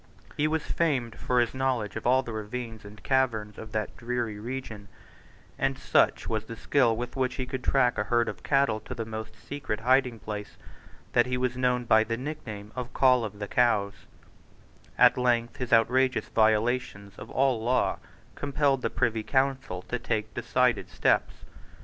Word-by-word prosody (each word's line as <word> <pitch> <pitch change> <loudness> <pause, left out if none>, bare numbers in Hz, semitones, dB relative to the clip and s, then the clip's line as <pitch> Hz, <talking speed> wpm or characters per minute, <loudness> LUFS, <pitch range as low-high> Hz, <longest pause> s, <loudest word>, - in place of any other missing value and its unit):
He 150 - +1
was 160 0 -1
famed 130 -9 0
for 125 -1 0
his 120 -1 +1
knowledge 130 -6 -1
of - - -3
all 130 +2 +4
the 120 - -6
ravines 110 +1 -6
and 105 +1 -12
caverns 115 -6 0
of 110 -1 -9
that 110 -1 -2
dreary 120 -3 -3
region; 115 -3 -6 0.7
and - - 0
such - - +2
was 110 -1 -2
the 115 - -7
skill 115 -1 +2
with 120 +1 -5
which 130 -1 0
he 130 - -3
could 130 0 -5
track 125 -5 +2
a 105 - 0
herd 120 +2 +2
of - - -5
cattle 135 -6 +2
to 125 +4 -8
the 115 -2 -4
most 110 0 -7
secret 135 -7 -5
hidingplace 115 -5 0 0.6
that 120 +1 +4
he 125 0 -1
was 125 0 -1
known 125 -1 +1
by 110 -1 +5
the 115 +1 -3
nickname 115 -7 -7
of 125 0 -5
Coll 130 -2 +4
of 105 -2 -5
the 105 0 -5
Cows, 105 -4 +2 1.0
At - - +6
length 120 -2 +1
his 125 -2 -4
outrageous 125 +3 +3
violations 110 -2 +1
of 110 - -9
all 130 -4 +1
law 125 +2 +1 0.3
compelled 140 -1 0
the - - 0
Privy 115 -2 0
Council 130 -7 -1
to 125 - -4
take 110 -2 -2
decided 120 0 +1
steps. - - 0
120 Hz, 175 wpm, -27 LUFS, 110-130 Hz, 1.0 s, At